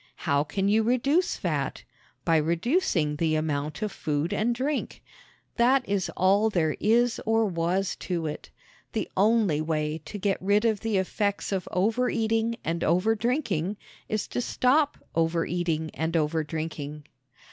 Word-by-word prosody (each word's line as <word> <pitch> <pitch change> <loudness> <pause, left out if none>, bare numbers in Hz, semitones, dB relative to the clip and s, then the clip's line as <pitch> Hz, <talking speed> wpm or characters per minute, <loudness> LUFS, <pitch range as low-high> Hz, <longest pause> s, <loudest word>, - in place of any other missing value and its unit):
How 140 -2 +1
can 195 +6 -1
you 215 +2 +4
reduce 265 +9 +2
fat? - - -2 0.4
By 165 -2 +4
reducing 165 - +1
the 160 0 +1
amount 150 +1 -2
of 210 - -2
food 150 +2 -2
and 235 +3 +1
drink 275 +4 -3 0.5
that 250 +2 +3
is 200 -2 0
all 200 +4 +4
there 160 -7 +1
is 235 +2 +2
or 225 0 +2
was 180 +1 0
to 170 -3 -3
it. 150 - -5 0.4
The - - -1
only 205 -6 +3
way 155 0 -1
to 210 - -6
get 195 -1 -1
rid 205 +4 +2
of 220 -3 +2
the 225 -3 0
effects 200 +2 -1
of 190 -2 -2
overeating 225 +2 +1
and 165 +1 -2
overdrinking 215 - +1 0.3
is 215 -1 -1
to - - -2
stop 280 +5 +2 0.2
overeating 165 -1 0
and 160 +1 -2
overdrinking. 155 -2 -2
190 Hz, 140 wpm, -27 LUFS, 160-225 Hz, 0.5 s, you